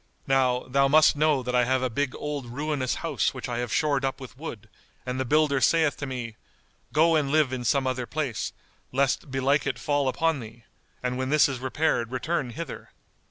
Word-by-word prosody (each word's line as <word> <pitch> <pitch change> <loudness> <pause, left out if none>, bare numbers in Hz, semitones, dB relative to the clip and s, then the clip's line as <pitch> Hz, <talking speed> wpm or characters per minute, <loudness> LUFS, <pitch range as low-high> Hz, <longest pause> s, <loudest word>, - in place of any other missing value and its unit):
Now, 130 -2 +2
thou 140 +2 +3
must 155 +2 +5
know 150 -3 +2
that 125 +1 -3
I 125 0 +4
have 130 +1 +1
a - - +2
big 130 +3 -2
old 145 -4 -4
ruinous 140 +1 -2
house - - 0
which - - -5
I 120 -1 -3
have 120 -2 -3
shored 145 -3 +1
up 135 +1 -1
with 130 -2 -10
wood, 125 -7 -8 0.4
and 125 +1 -3
the 130 - 0
builder 145 0 +2
saith 160 0 +3
to 145 - -5
me, 120 -4 -5 0.5
'Go 165 +2 +4
and 145 -3 +1
live 150 -3 +2
in 125 -1 -3
some 135 +2 +2
other 130 -1 -2
place, 145 -7 -2 0.4
lest 140 +3 0
belike 135 +2 +1
it 130 -4 -1
fall 145 +4 0
upon 160 +3 +1
thee; 115 0 -11 0.4
and 125 0 -2
when 130 0 -1
this 150 +1 +5
is 135 -3 -4
repaired 130 -2 0
return 135 +1 -1
hither. 155 +4 -7
135 Hz, 205 wpm, -26 LUFS, 125-150 Hz, 0.5 s, must